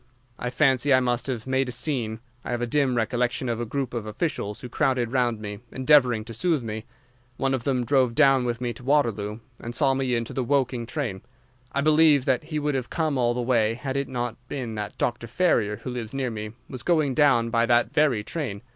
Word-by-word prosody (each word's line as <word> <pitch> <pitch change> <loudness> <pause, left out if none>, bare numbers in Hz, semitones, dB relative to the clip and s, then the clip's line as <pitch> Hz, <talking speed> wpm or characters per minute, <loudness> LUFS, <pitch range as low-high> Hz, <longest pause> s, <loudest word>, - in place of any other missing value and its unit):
I 125 - -2
fancy 135 0 +2
I 130 - +7
must 125 -1 -1
have 120 -5 -3
made 130 0 0
a - - -2
scene. 120 -3 -1 0.2
I - - -7
have 120 -1 -1
a - - +2
dim 130 0 +1
recollection 120 +2 0
of 120 0 -1
a 120 - -3
group 135 +1 -3
of 115 -3 -4
officials 105 -2 -3
who 125 - -6
crowded 125 -1 0
round 120 -4 +1
me, 105 -1 -6
endeavouring 130 -5 +3
to 115 - -8
soothe 155 +3 0
me. 110 -1 -5 0.5
One 135 0 0
of 130 -3 -2
them 130 -3 +1
drove 130 -3 +2
down 135 -1 +5
with 120 -1 -2
me 120 -1 -2
to 120 - -13
Waterloo, 115 -6 0 0.2
and 120 +1 -6
saw 135 -3 +3
me 130 -2 0
into 115 -1 -3
the 130 - -1
Woking 130 -3 0
train. 120 -8 -3 0.5
I 140 - 0
believe 155 -2 +5
that 130 +2 +1
he 155 -1 -4
would 150 0 0
have 130 -2 -2
come 155 -3 0
all 120 -2 +1
the 125 - -1
way 115 -3 +2
had 135 +2 -4
it 140 0 -1
not 120 -2 -3
been 125 -5 -4
that 105 -1 -5
Dr. 120 -1 -1
Ferrier, 115 - +1
who 125 - -4
lives 120 0 -5
near 130 -3 -1
me, 105 -1 -6
was 130 - -6
going 155 -1 +2
down 125 -5 +3
by 115 0 +2
that 120 +2 +3
very 145 -9 +2
train. 115 -8 -4
125 Hz, 225 wpm, -25 LUFS, 115-135 Hz, 0.5 s, I